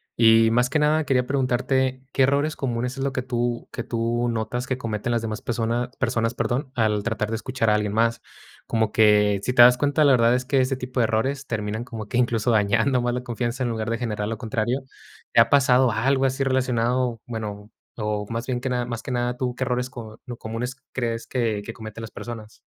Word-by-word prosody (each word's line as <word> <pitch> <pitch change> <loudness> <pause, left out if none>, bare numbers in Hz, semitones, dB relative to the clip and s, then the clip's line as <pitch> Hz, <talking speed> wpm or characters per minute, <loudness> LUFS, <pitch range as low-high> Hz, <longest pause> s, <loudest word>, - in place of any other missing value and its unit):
y 115 -1 +6
más 125 +2 +2
que 150 - +1
nada 150 +1 +3
quería 125 -3 +1
preguntarte, 130 0 0
¿qué 135 - +3
errores 140 +3 +2
comunes 125 0 -3
es 135 - -2
lo 140 - 0
que 130 -1 -3
tú 120 -1 -2
que 120 - -4
tú 120 0 -1
notas 120 +2 -3
que 130 - -1
cometen 115 -1 -3
las 120 -1 +1
demás 110 -1 -4
persona 120 +1 -1
personas, 115 -2 0
perdón, 130 +3 -2
al 110 -3 +1
tratar 105 -2 -2
de 115 - -1
escuchar 115 0 -1
a 105 - +4
alguien 105 -1 0
más? 115 +1 +1 0.5
Como 110 -2 0
que, 105 -2 +4
si - - 0
te 125 - +6
das 125 0 +7
cuenta, 145 +3 +2
la 140 - +6
verdad 120 -1 +4
es 125 +1 +1
que 135 0 +2
ese 130 +1 0
tipo 125 0 -2
de - - +4
errores 135 +5 -1
terminan 110 -1 -3
como 115 -3 -7
que 120 - -2
incluso 120 -1 +1
dañando 110 +4 +2
más 120 0 0
la 125 0 -3
confianza 120 +1 -3
en 120 - 0
lugar 110 -1 -3
de 115 - 0
generar 105 -4 -3
lo 115 - -3
contrario, 115 +3 -1 0.5
¿te 115 - +7
ha 115 - +3
pasado 130 -2 +4
algo 130 +5 +1
así 135 +1 0
relacionado? 125 -2 0
Bueno, 105 -3 -6 0.3
o 105 -1 -2
más 115 +1 -3
bien 125 -2 -1
que 130 - -2
nada 125 -1 -1
más 115 -2 -5
que - - -7
nada, 125 0 -1
tú, 125 -1 -2
¿qué 130 - -2
errores 125 0 -1
co 115 -3 -10
lo 120 -1 -6
comunes 115 +4 -4 0.2
crees 115 -2 -2
que 115 -5 -1
que 115 - -6
cometen 110 -1 -9
las 115 - -8
personas? 110 -2 -9
120 Hz, 225 wpm, -24 LUFS, 110-130 Hz, 0.5 s, das